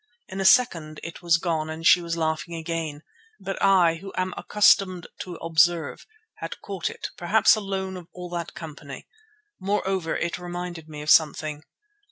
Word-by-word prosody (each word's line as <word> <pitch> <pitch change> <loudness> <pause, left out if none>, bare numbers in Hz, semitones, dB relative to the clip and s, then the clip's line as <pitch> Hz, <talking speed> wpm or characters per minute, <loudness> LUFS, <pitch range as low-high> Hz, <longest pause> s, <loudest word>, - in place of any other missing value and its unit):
In 190 +1 -4
a - - -1
second 165 -10 +4
it 165 - -8
was 170 -2 +4
gone 160 -2 -2
and 160 +1 -6
she 175 - +7
was 170 0 -3
laughing 160 0 -2
again; 160 -2 -4 0.4
but 195 - -5
I, 180 -4 +4
who 195 +3 -9
am 185 0 -1
accustomed 190 -4 +3
to 180 -2 -6
observe, 165 -1 +1 0.3
had - - -6
caught 195 -4 -3
it, - - -6
perhaps 205 +6 +4
alone 195 -2 -3
of 175 -2 -11
all 180 -1 -8
that 170 -1 -5
company. 145 -4 -9 0.5
Moreover, 190 -3 -1
it 170 +1 -2
reminded 175 -2 -6
me 150 -1 -7
of 150 - +2
something. 155 -1 +3
170 Hz, 165 wpm, -25 LUFS, 160-185 Hz, 0.5 s, she